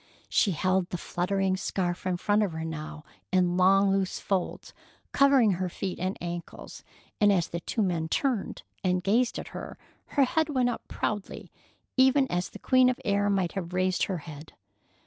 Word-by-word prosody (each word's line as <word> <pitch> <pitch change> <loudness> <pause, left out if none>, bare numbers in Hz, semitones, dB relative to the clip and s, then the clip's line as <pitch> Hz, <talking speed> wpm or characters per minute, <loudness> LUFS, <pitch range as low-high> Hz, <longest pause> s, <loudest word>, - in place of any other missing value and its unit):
She 200 - +2
held 185 +3 +1
the 180 - -3
fluttering 190 +2 -1
scarf 185 -1 -2
in 180 -1 0
front 205 +4 +2
of 200 -6 0
her 160 0 -4
now, 155 -1 -6 0.3
in 180 -1 +2
long 195 +2 +4
loose 195 -1 0
folds 190 -3 -3 0.4
covering 275 -6 +5
her 185 0 -1
feet 185 +1 -5
and 185 +2 -2
ankles, 175 0 -7 0.4
and 205 -2 +5
as 175 -4 +2
the 170 - -4
two 215 +6 -1
men 170 -4 -1
turned 255 - -1 0.2
and 180 -1 +1
gazed 230 +6 +2
at - - -6
her - - -8 0.4
her 280 - +6
head 315 +4 +1
went 255 -4 +1
up 240 - -4
proudly, 205 -2 -4 0.5
even 265 +1 +5
as 180 +1 -1
the - - -10
queen 255 -1 +4
of 255 - 0
the - - -20
air 205 -1 +2
might 190 -4 +1
have 180 -2 -5
raised 185 0 +1
her 190 - -3
head. 155 0 -10
190 Hz, 185 wpm, -28 LUFS, 175-210 Hz, 0.5 s, her